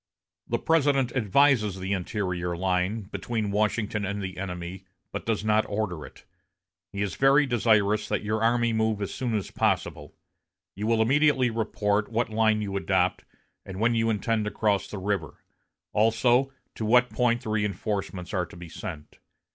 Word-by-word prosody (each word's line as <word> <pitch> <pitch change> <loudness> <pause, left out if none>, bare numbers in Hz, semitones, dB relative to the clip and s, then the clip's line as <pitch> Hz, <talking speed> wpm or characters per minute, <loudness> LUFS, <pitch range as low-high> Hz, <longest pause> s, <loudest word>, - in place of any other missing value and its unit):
The - - 0
President 140 -6 +2
advises 110 -3 +3
the 95 +1 -2
interior 90 -2 -2
line, 95 +4 0
between 105 +1 -3
Washington 105 0 0
and 100 +1 -2
the 95 -2 -5
enemy, 90 0 -6 0.3
but - - -6
does 110 -2 -1
not 110 0 +3
order 100 -7 -3
it. - - -18 0.7
He 100 0 -2
is 100 -4 -3
very 140 +2 +5
desirous 110 -4 +2
that - - -1
your 110 +1 -1
army 120 0 +2
move 110 -1 +1
as 100 - -4
soon 120 -4 -2
as 100 -4 -3
possible. - - -1 0.6
You 105 +2 -4
will 115 -1 +3
immediately 135 0 +3
report 105 -2 0
what 115 0 0
line 110 -1 +2
you 100 -1 -4
adopt, 95 -2 0 0.4
and 95 0 -8
when 120 +2 +3
you 115 0 +1
intend 110 0 0
to - - -1
cross 105 -2 0
the 105 - -7
river; 95 -4 -3 0.5
also 120 +5 +3 0.2
to - - -6
what 125 +3 +4
point 120 -1 +1
the - - -5
reinforcements 100 -3 -2
are 90 -3 0
to 85 - -13
be 85 -1 -9
sent. 75 -1 -8
105 Hz, 165 wpm, -26 LUFS, 95-115 Hz, 0.7 s, very